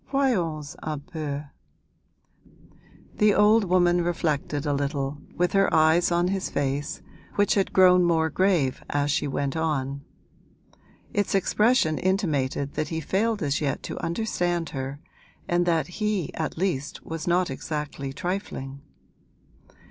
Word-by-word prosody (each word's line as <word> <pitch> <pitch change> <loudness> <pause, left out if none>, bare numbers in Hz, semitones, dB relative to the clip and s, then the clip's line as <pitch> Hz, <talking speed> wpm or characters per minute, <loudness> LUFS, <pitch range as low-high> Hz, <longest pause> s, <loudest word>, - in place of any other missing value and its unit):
Voyons 175 - 0
un 155 -2 -3
peu!' 145 -2 -5 1.7
The 210 -1 +4
old 210 +1 +5
woman 175 -1 +3
reflected 155 -3 -1
a 145 - +1
little, 140 0 -2 0.2
with 180 0 +1
her 195 0 +3
eyes 160 +2 +4
on 175 +1 +2
his 195 0 -2
face, 140 +1 -2 0.3
which 205 0 +3
had 195 -2 +1
grown 180 -1 +6
more 160 -2 +2
grave 175 -8 +1
as 145 0 0
she 145 0 0
went 140 +1 -2
on; 140 -4 -1 1.1
its 205 -2 0
expression 195 -4 +2
intimated 145 -8 0
that 155 - -2
he 160 +1 -3
failed 210 +7 0
as 140 +1 0
yet 140 -3 -1
to - - -5
understand 175 -3 -1
her 135 +1 -5 0.5
and 175 0 +1
that 165 -2 +2 0.2
he 210 -7 0
at 160 -1 -3
least 160 -6 -2
was 165 0 -5
not 175 -2 +2
exactly 145 -1 -4
trifling. 140 -4 -4
160 Hz, 135 wpm, -25 LUFS, 145-185 Hz, 1.7 s, grown